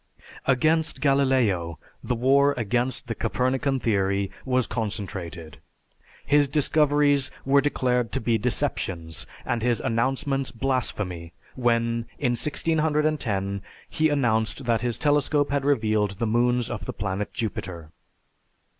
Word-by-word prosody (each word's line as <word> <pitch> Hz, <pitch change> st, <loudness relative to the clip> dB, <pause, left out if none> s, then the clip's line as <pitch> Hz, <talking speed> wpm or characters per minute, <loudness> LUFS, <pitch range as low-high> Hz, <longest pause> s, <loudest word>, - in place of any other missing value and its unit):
Against 155 Hz, +5 st, +2 dB
Galileo, 130 Hz, -, +2 dB, 0.3 s
the 125 Hz, -, -1 dB
war 140 Hz, +4 st, +3 dB
against 120 Hz, +3 st, 0 dB
the 115 Hz, -, -3 dB
Copernican 130 Hz, +4 st, 0 dB
theory 100 Hz, -3 st, 0 dB
was 130 Hz, -2 st, +1 dB
concentrated. 95 Hz, -, -5 dB, 0.7 s
His 145 Hz, 0 st, +4 dB
discoveries 145 Hz, -1 st, +3 dB, 0.2 s
were 140 Hz, +1 st, +4 dB
declared 125 Hz, -5 st, 0 dB
to -, -, 0 dB
be 115 Hz, 0 st, +1 dB
deceptions, 95 Hz, -, -2 dB, 0.2 s
and 120 Hz, -2 st, -1 dB
his 120 Hz, 0 st, +1 dB
announcements 135 Hz, +3 st, -1 dB
blasphemy 105 Hz, -9 st, -2 dB, 0.2 s
when, 115 Hz, -2 st, 0 dB
in 125 Hz, -4 st, +1 dB
1610, 150 Hz, -8 st, 0 dB, 0.3 s
he 155 Hz, 0 st, +2 dB
announced 120 Hz, -3 st, 0 dB
that 115 Hz, -2 st, +1 dB
his 120 Hz, -1 st, 0 dB
telescope 145 Hz, 0 st, +2 dB
had 140 Hz, -1 st, 0 dB
revealed 110 Hz, -7 st, +1 dB
the 115 Hz, -, -1 dB
moons 120 Hz, +2 st, +1 dB
of 105 Hz, -6 st, -5 dB
the -, -, -4 dB
planet 100 Hz, 0 st, -3 dB
Jupiter. 85 Hz, -6 st, -5 dB
120 Hz, 120 wpm, -25 LUFS, 105-140 Hz, 0.7 s, His